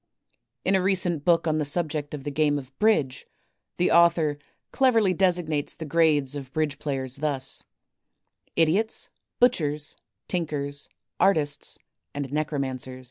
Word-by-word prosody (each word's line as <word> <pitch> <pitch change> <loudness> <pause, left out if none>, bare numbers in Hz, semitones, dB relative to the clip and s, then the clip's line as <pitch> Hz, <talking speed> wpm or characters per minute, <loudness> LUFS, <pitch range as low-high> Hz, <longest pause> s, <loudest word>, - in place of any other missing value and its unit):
In 190 - +3
a 190 - +4
recent 180 -5 +1
book 170 0 +3
on 155 -1 +1
the - - +1
subject 150 -1 -2
of 140 - -8
the 145 - -3
game 145 0 +2
of 135 -1 -9
Bridge, 180 -12 +1 0.5
the 180 - +2
author 165 -3 +4 0.3
cleverly 230 -8 +3
designates 175 -5 0
the 160 - -6
grades 150 -3 +2
of 135 -2 -7
Bridge 155 -3 -1
players 135 -3 -3
thus: 140 -3 -2 0.9
Idiots, 180 +8 +2 0.3
Butchers, 155 - +1 0.3
Tinkers, 145 -5 -2 0.3
Artists, 150 -7 +1 0.4
and 140 -1 -4
Necromancer?. 135 -4 -2
155 Hz, 130 wpm, -26 LUFS, 145-175 Hz, 0.9 s, a